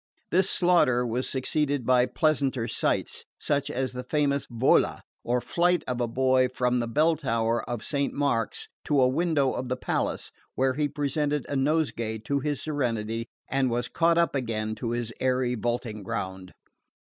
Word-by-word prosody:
This 190 +2 +3
slaughter 170 -9 +3
was 125 +2 -2
succeeded 140 0 -1
by 125 0 +4
pleasanter 140 -7 +1
sights, - - -1
such 145 -1 -1
as 130 -2 -2
the 125 0 -5
famous 140 0 0
Vola, 120 +2 +2 0.2
or 125 +1 +1
flight 175 +6 +1
of 125 -1 -2
a 120 - +1
boy 130 +2 +3
from 125 0 0
the 120 - -1
bell 155 +8 +3
tower 115 -5 0
of 120 -2 -4
Saint 140 -1 0
Mark's 135 -6 -1 0.2
to 145 - +2
a 130 - +5
window 145 -1 +1
of 125 0 -4
the 125 - -1
palace, - - -2 0.2
where 130 0 +2
he 150 +2 0
presented 145 0 -1
a 145 - -3
nosegay 135 -6 0
to 140 0 0
his 145 0 -2
Serenity 115 -6 -2 0.2
and 135 -1 +1
was 120 0 -1
caught 165 0 +2
up 170 0 +3
again 110 -5 -2
to 115 +2 -4
his 120 -1 -2
airy 130 -1 +1
vaulting 120 -2 -2
ground. 95 -3 -5
130 Hz, 170 wpm, -27 LUFS, 120-145 Hz, 0.2 s, a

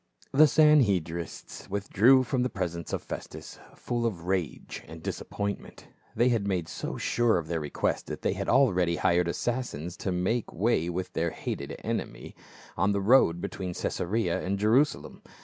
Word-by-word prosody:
The 155 +3 +7
Sanhedrists 100 - +2
withdrew 105 +6 +4
from 130 0 -1
the 125 - +1
presence 85 -6 -4
of - - -3
Festus - - -8 0.2
full 120 -1 -2
of 90 -7 -5
rage 90 -4 -3
and 80 0 -11
disappointment. 100 0 -5 0.3
They 120 +3 +3
had 115 -5 0
made 90 -4 -1
so - - -5
sure 120 -4 +2
of 85 - -3
their 85 0 -1
request 75 -2 -2
that - - -6
they - - +1
had - - -4
already 95 -10 +3
hired 90 -1 +2
assassins 90 - -3
to 95 - -3
make 95 +6 -1
way 95 -3 +1
with 90 +1 -4
their 85 +1 0
hated 70 -3 -5
enemy - - -4 0.4
on 100 +1 +2
the 100 - 0
road 100 -5 +4
between 90 -2 -5
Caesarea 90 -1 -1
and 100 +2 -1
Jerusalem. 115 +9 +1
95 Hz, 160 wpm, -28 LUFS, 85-120 Hz, 0.4 s, The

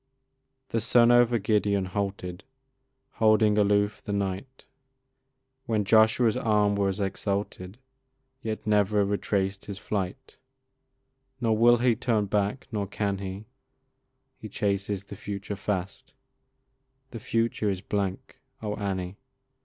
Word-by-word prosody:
The 115 - 0
sun 120 +1 +5
over 120 -1 +5
Gideon 100 -2 +1
halted, 95 -1 -4 0.7
Holding 110 -1 +3
aloof 105 0 +2
the 105 - -6
night, 100 +6 -3 1.0
When 110 -3 +1
Joshua's 110 +2 +4
arm 105 -2 +2
was 100 0 0
exalted, 100 0 -3 0.6
Yet 110 -3 -4
never 105 -1 +3
retraced 100 -1 -1
his 100 -2 -6
flight; 100 +3 -4 1.0
Nor 115 -3 +2
will 120 +2 +6
he 120 0 +3
turn 110 -3 0
back, 100 +5 -1
nor 105 -3 -2
can 100 0 -2
he, 95 +2 -6 0.9
He 110 - -8
chases 100 -1 -1
the 100 0 -10
future 100 +1 -5
fast; 95 -1 -4 1.0
The 115 - -6
future 115 -1 0
is 95 -2 -2
blank 100 -1 -3 0.2
oh, 105 -1 -3
Annie! 95 -2 -3
105 Hz, 115 wpm, -27 LUFS, 100-110 Hz, 1.0 s, will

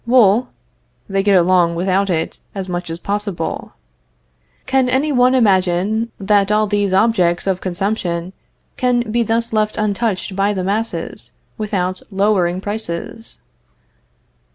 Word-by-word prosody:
Wool? 235 -1 +4 0.6
They 195 0 0
get 200 -1 +4
along 175 -1 +3
without 190 +3 +1
it 160 -2 -1 0.2
as 190 -1 -4
much 175 -1 -4
as 165 - -4
possible. 200 -3 -4 0.9
Can 265 -1 +2
any 270 +4 +1
one 250 -1 +4
imagine 200 0 +2
that 200 0 +2
all 215 0 +3
these 205 -1 0
objects 190 -4 +2
of 190 -2 -1
consumption 185 -2 -2 0.4
can 245 -3 +1
be 235 +2 +1
thus 230 +1 0
left 215 -1 0
untouched 205 -2 -1
by 200 +2 +1
the 190 -2 -2
masses, 215 +4 -3 0.2
without 185 -4 -2
lowering 190 -3 +1
prices? 210 +1 -5
200 Hz, 130 wpm, -18 LUFS, 185-220 Hz, 0.9 s, Wool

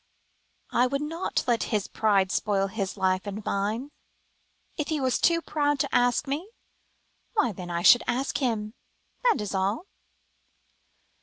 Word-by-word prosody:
"I 250 - +3
would 275 +3 -2
not 330 +4 -2
let 240 -2 +1
his 210 -3 0
pride 200 -3 +2
spoil 200 -2 +1
his 195 0 -4
life 190 +1 +1
and 205 +1 -5
mine. 215 +8 -2 0.8
If 300 -3 -2
he 310 -2 -1
was 260 -2 +1
too 335 -1 +3
proud 290 -1 0
to 280 0 -1
ask 245 +4 +3
me 305 +9 -3 0.8
why, 245 - +2
then, 180 -2 -8
I 170 0 -2
should 245 - +8
ask 265 +3 -1
him, 220 -5 -1 0.5
that 480 - +4
is 210 -2 -4
all." 200 - 0
235 Hz, 150 wpm, -27 LUFS, 200-285 Hz, 0.8 s, should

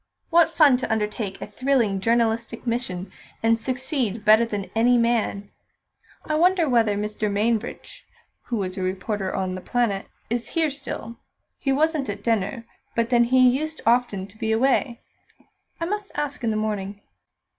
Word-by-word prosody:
"What 335 -1 +5
fun 305 -6 +5
to 255 - -4
undertake 210 -2 -2
a - - -5
thrilling 230 -3 +1
journalistic 230 +2 0
mission, 200 -6 -3 0.3
and 225 0 +3
succeed 255 - -2
better 215 +2 +6
than 205 -4 -5
any 245 +2 +4
man! 230 -4 0 0.7
I 310 - -2
wonder 345 +1 +3
whether 230 -5 +3
Mr. 210 0 -2
Mainbridge, 230 - -2 0.4
who 240 - -2
was 190 -1 -3
a - - -3
reporter 190 +1 -2
on 185 -1 -2
The 185 - -6
Planet, 220 -3 -1 0.2
is 235 +1 -2
here 320 -2 +2
still. 235 -4 -7 0.4
He 270 - 0
wasn't 300 -2 +1
at 205 0 -5
dinner, 230 +1 -1 0.3
but 230 +1 0
then 235 -1 +5
he 255 +1 +5
used 305 +5 0
often 230 -5 +2
to 200 +3 -18
be 220 - -1
away. 240 0 +1 0.8
I 335 - -1
must 415 +2 -4
ask 290 -2 -3
in 230 - +1
the 215 - 0
morning." 205 -2 -3
230 Hz, 160 wpm, -24 LUFS, 210-260 Hz, 0.8 s, better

